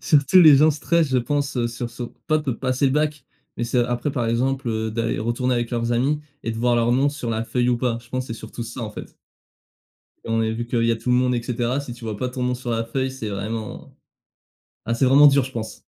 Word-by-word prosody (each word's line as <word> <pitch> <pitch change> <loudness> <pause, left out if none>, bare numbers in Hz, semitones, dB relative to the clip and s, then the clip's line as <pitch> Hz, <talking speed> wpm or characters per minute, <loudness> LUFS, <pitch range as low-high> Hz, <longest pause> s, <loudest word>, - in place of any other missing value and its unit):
Surtout 150 +4 +5
les 155 -5 +9
gens 155 +2 +6
stressent 160 +2 +1
je 130 -1 +2
pense 140 -1 -1
sur 120 0 -5
ce 120 +1 -6 0.2
pas 155 - +3
peu 135 -6 -3
passer 130 +1 0
le 130 - +1
bac 150 -2 0 0.3
mais 120 - -2
c'est 125 +1 0
après, 125 +3 -2
par 125 -4 -1
exemple 115 -2 -1
d'aller 115 +1 -1
retourner 120 +3 -1
avec 120 -1 -2
leurs 115 0 -1
amis 135 +5 +1 0.2
et 115 - -2
de 110 - -6
voir 120 +1 +2
leur 120 0 +2
nom 135 +3 +3
sur 145 -5 -5
la 110 0 -1
feuille 125 +1 0
ou 125 - +3
pas. 120 -1 -1
Je 120 - -20
pense 130 +1 -3
c'est 115 - -5
surtout 110 +1 -7
ça 120 +2 -7
en 110 - -4
fait. - - -10 1.1
On 115 0 0
est 110 0 0
vu 120 +1 -4
qu'il 115 -1 0
y 115 - +3
a 115 - +1
tout 115 +2 -3
le 125 - +4
monde 125 0 +2
et 120 - -1
cetera, 120 +2 -1
si 140 -4 -7
tu 120 0 -11
vois? 110 -2 -4
Pas 125 +5 -2
ton 125 0 -5
nom 125 0 0
sur 125 -1 -5
la 115 0 0
feuille 130 +3 -2
c'est 130 -5 -6
vraiment 105 +2 -5 0.9
ah, 115 - -1
c'est 115 - +1
vraiment 140 +3 +7
dur, 140 -2 +5
je 130 - -9
pense. 110 -3 -6
125 Hz, 255 wpm, -22 LUFS, 115-135 Hz, 1.1 s, les